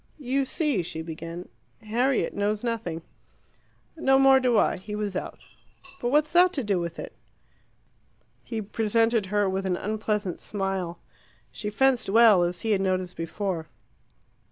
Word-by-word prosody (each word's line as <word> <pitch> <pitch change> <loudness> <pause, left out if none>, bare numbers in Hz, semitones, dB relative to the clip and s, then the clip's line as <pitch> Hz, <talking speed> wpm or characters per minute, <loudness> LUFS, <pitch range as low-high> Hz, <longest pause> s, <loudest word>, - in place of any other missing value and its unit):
"You 275 -1 0
see," 290 - 0
she 160 -1 -6
began, 165 +2 -7 0.4
"Harriet 240 +4 +1
knows 205 +2 -1
nothing." 210 -9 -3 0.9
"No 270 -4 +3
more 270 0 +6
do 250 -3 +2
I. - - +3
He 210 +3 -7
was 210 -2 -3
out." - - -5 0.6
"But 240 - 0
what's 300 +3 +2
that 355 +1 +6
to 275 - -1
do 200 -4 +1
with 170 -1 -4
it?" - - -7 1.3
He 225 -2 -4
presented 225 +1 +1
her 205 +1 +1
with 190 0 -1
an 180 -1 0
unpleasant 210 -2 -2
smile. 195 -4 -3 0.5
She 130 +12 -4
fenced 255 0 +2
well, 220 -3 +6
as 175 0 -1
he 225 - -1
had 195 -2 +2
noticed 185 -1 -1
before. 165 0 -3
210 Hz, 150 wpm, -26 LUFS, 185-240 Hz, 1.3 s, more